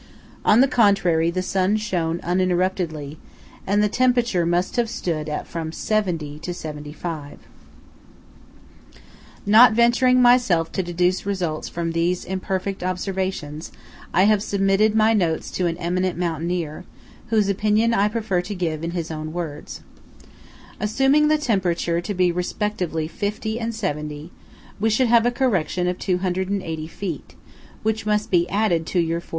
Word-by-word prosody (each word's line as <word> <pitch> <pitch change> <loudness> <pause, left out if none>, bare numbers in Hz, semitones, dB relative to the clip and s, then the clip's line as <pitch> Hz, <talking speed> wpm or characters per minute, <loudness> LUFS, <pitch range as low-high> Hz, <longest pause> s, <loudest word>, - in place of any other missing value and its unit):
On 220 +4 +5
the 270 - +5
contrary, 195 -9 +3
the 185 +2 -2
sun 190 +2 +1
shone 175 -6 -2
uninterruptedly, 175 -4 -1 0.5
and 205 +2 +2
the - - +4
temperature 240 -6 +1
must 175 +1 0
have 235 -2 +1
stood 155 -6 -3
at 150 - -3
from 165 -1 -5
70° 165 -6 -2
to - - -6
75°. 150 -1 -7 2.1
Not 220 +3 +7
venturing 240 +2 +4
myself 240 -10 +4
to - - -1
deduce 180 +2 0
results 175 -6 -2
from 170 -1 -3
these 170 +2 0
imperfect 190 +1 -3
observations, 185 -4 -3 0.4
I 185 - +4
have 210 0 +4
submitted 200 +1 +2
my 220 +1 +4
notes 170 -7 0
to 180 - 0
an 165 -1 -2
eminent 180 +1 -1
mountaineer, 170 -2 -2 0.4
whose 215 -3 +2
opinion 215 +3 +2
I 205 -2 +3
prefer 210 -4 -1
to 205 +3 -6
give 165 -3 -2
in 170 - -2
his 165 -1 -4
own 155 0 -5
words:–"Assuming 215 - -3
the 310 0 +3
temperature 180 - 0
to 205 - -4
be 180 -1 +3
respectively 180 -2 -2
50° 220 +4 -3
and 230 0 -2
70°, 150 -6 -4 0.5
we 220 +2 +2
should 235 +3 +2
have 235 0 +5
a - - +2
correction 190 -8 0
of 180 0 -2
280 185 -3 -2
feet27, 170 -2 -5 0.6
which 220 0 -1
must 210 0 0
be 175 -1 +2
added 190 -6 +1
to 180 - 0
your 165 0 0
4,500. - - -22
185 Hz, 145 wpm, -22 LUFS, 170-215 Hz, 2.1 s, Not